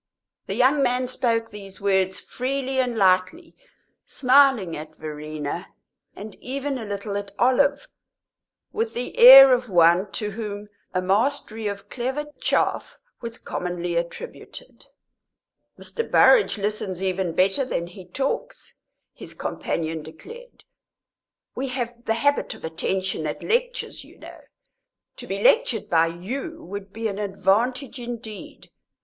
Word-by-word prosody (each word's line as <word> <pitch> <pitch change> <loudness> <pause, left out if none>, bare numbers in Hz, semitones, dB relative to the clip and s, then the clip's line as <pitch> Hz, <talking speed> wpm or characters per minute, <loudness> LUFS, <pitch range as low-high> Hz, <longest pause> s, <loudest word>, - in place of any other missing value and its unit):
The - - -3
young 275 +3 +3
man 250 -1 +1
spoke 230 -3 -1
these 195 -2 -11
words 190 -1 +1
freely 265 +1 -3
and 245 -3 0
lightly, 190 - +1 0.5
smiling 255 -9 +3
at 155 +1 -9
Verena, 155 +2 -6 0.4
and 210 +1 -9
even 275 +1 -3
a 225 - -6
little 200 0 -4
at 205 0 -5
Olive, 280 - +2 0.9
with 450 +1 -2
the 245 - -4
air 265 +2 +11
of 250 -1 0
one 175 +2 +4
to 210 +3 -3
whom 205 -1 -6 0.2
a 185 0 -1
mastery 220 +2 0
of 200 -1 -6
clever 260 +4 -3
"chaff" - - 0 0.2
was 230 -1 -6
commonly 175 -1 -4
attributed. 170 - -6 0.9
"Mr. 465 - -5
Burrage 455 - +5
listens 200 -3 -3
even 185 -2 -1
better 195 +8 +2
than 210 -9 -3
he 180 +2 -12
talks," 275 - -4 0.3
his - - -11
companion 160 -1 -3
declared. 450 - -13 0.9
"We 270 +2 -3
have 245 -2 -5
the 225 - +1
habit 285 +5 0
of - - -10
attention 170 0 -2
at 150 - -5
lectures, - - -1
you - - -18
know. - - -12 0.8
To - - -10
be - - -3
lectured - - +3
by 165 -1 +4
you 245 - -6
would 200 +1 -8
be 225 +2 -3
an 200 -1 -5
advantage 215 +7 0
indeed. 235 -3 -8
220 Hz, 130 wpm, -24 LUFS, 185-265 Hz, 0.9 s, air